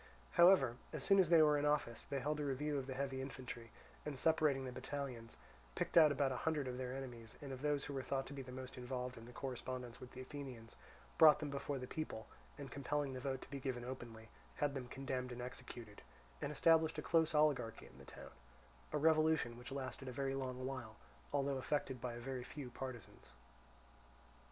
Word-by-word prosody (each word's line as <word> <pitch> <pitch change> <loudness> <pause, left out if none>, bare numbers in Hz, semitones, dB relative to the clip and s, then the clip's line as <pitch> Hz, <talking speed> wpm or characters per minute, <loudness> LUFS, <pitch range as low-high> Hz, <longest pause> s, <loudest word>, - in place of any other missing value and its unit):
However, 170 -9 +6
as - - -4
soon 195 -1 +6
as 180 -4 +5
they 165 -2 +8
were 150 -1 +5
in - - -1
office, 145 -6 0
they 140 - -2
held 150 +3 -1
a - - 0
review 145 +1 0
of 135 - -5
the 130 - -4
heavy 135 -1 -2
infantry, 130 -3 -6 0.3
and 150 -2 -4
separating 150 -3 +3
the 130 - -4
battalions, 125 -4 -5 0.4
picked - - -2
out 155 -3 +9
about 140 -1 +2
a 130 - -1
hundred 150 -3 0
of 125 0 -3
their 130 0 -3
enemies, 120 -4 -7
and 140 -2 -7
of 130 - -7
those 145 -1 +1
who 145 - -5
were 135 - -1
thought 135 0 -1
to 140 - -8
be 140 - -5
most 130 +1 -7
involved 125 0 -3
in 115 0 -10
the - - -10
correspondence 125 -1 -5
with 125 - -10
the 130 - -7
Athenians, 130 -4 -8 0.4
brought 155 -2 +10
them 150 -2 -4
before 140 0 -2
the 125 - -4
people, 125 -6 -4 0.3
and 140 -3 -7
compelling 140 +1 -1
the 130 - -4
vote 130 0 -2
to - - -14
be 140 - -3
given 130 -3 -3
openly, 115 -3 -7 0.3
had 145 -1 +1
them 130 -3 -4
condemned 130 0 -3
and 125 - -6
executed, 120 -4 -8 0.4
and 145 - -1
established 160 +2 +4
a - - -3
close 160 -1 +3
oligarchy 130 -7 +2
in 60 - -15
the 65 - -12
town—a 65 - -10
revolution 155 -5 +4
which 125 +3 -9
lasted 135 0 -4
a - - -3
very 135 +1 -1
long 130 -1 -3
while, 130 -5 -5 0.4
although 140 -1 +1
effected 130 -2 -1
by 125 -1 -2
a - - -6
very 125 +1 -4
few 130 -1 -7
partisans. 120 -6 -7
130 Hz, 205 wpm, -39 LUFS, 125-145 Hz, 0.4 s, brought